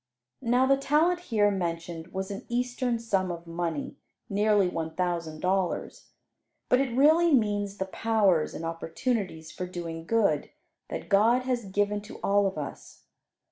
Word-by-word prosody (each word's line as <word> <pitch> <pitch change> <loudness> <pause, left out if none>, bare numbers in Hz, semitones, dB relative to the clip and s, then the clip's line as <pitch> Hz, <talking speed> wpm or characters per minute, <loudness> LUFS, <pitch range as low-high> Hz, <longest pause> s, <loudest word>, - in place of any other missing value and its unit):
Now 250 +1 +3
the 275 +1 +4
talent 310 +6 +2
here 215 -11 +2
mentioned 170 -3 -3
was 190 +2 -4
an 195 - -7
eastern 245 0 0
sum 195 -5 0
of 170 0 -7
money 165 -3 -3 0.3
(nearly 205 -1 +3
one 160 -2 -4
thousand 170 -3 -2
dollars), 185 -1 -1 0.6
but 250 - +5
it 250 -3 -2
really 320 +5 +5
means 205 -5 +1
the 190 - -1
powers 195 -5 +1
and 165 - -5
opportunities 165 0 -3
for 180 - -5
doing 165 -2 -6
good 200 -10 +2 0.4
that - - -5
God 230 +6 +4
has 250 -3 -1
given 205 +1 0
to 210 - -11
all 200 0 +3
of 190 - -4
us. 145 -2 -8
200 Hz, 150 wpm, -28 LUFS, 170-235 Hz, 0.6 s, but